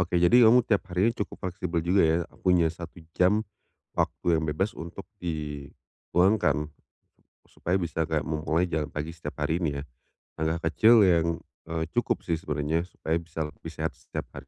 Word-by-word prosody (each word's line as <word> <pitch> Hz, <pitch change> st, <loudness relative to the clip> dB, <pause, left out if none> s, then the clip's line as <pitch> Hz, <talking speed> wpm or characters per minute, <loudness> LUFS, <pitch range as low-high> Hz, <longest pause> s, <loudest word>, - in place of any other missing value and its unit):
Oke, 90 Hz, 0 st, 0 dB
jadi 110 Hz, +7 st, +6 dB
kamu 120 Hz, +1 st, +6 dB
tiap 100 Hz, -3 st, +2 dB
harinya 95 Hz, +6 st, +2 dB
cukup -, -, -3 dB
fleksibel 85 Hz, -1 st, -2 dB
juga 95 Hz, +3 st, +4 dB
ya, 80 Hz, 0 st, +3 dB, 0.2 s
punya 90 Hz, -3 st, +4 dB
1 85 Hz, -1 st, -10 dB, 0.2 s
jam 105 Hz, +4 st, +3 dB, 0.5 s
waktu 85 Hz, -2 st, +1 dB
yang -, -, -2 dB
bebas 95 Hz, +8 st, 0 dB
untuk 85 Hz, +4 st, -8 dB, 0.2 s
di 75 Hz, -4 st, -4 dB, 0.5 s
luangkan 90 Hz, -5 st, +3 dB, 0.8 s
supaya 90 Hz, +3 st, -1 dB
bisa 80 Hz, -2 st, -1 dB
kayak 80 Hz, 0 st, -1 dB
mau 80 Hz, -1 st, -2 dB
mulai 85 Hz, +3 st, +1 dB
jalan 80 Hz, -3 st, -2 dB
pagi 75 Hz, +3 st, -5 dB
setiap 80 Hz, -, -8 dB
hari 85 Hz, +3 st, -1 dB
ini 70 Hz, -3 st, -1 dB
ya. 70 Hz, -, -6 dB, 0.6 s
Langkah 80 Hz, +1 st, 0 dB
kecil 110 Hz, +2 st, +6 dB
yang, 85 Hz, -3 st, +4 dB, 0.4 s
eee, 80 Hz, 0 st, -2 dB
cukup -, -, 0 dB
sih 80 Hz, -2 st, -1 dB
sebenarnya 75 Hz, +3 st, -1 dB
supaya 80 Hz, -2 st, -2 dB
bisa 85 Hz, -1 st, -9 dB
lebih -, -, -10 dB
sehat -, -, -3 dB
setiap -, -, -5 dB
hari. -, -, -10 dB
85 Hz, 175 wpm, -27 LUFS, 80-90 Hz, 0.8 s, jadi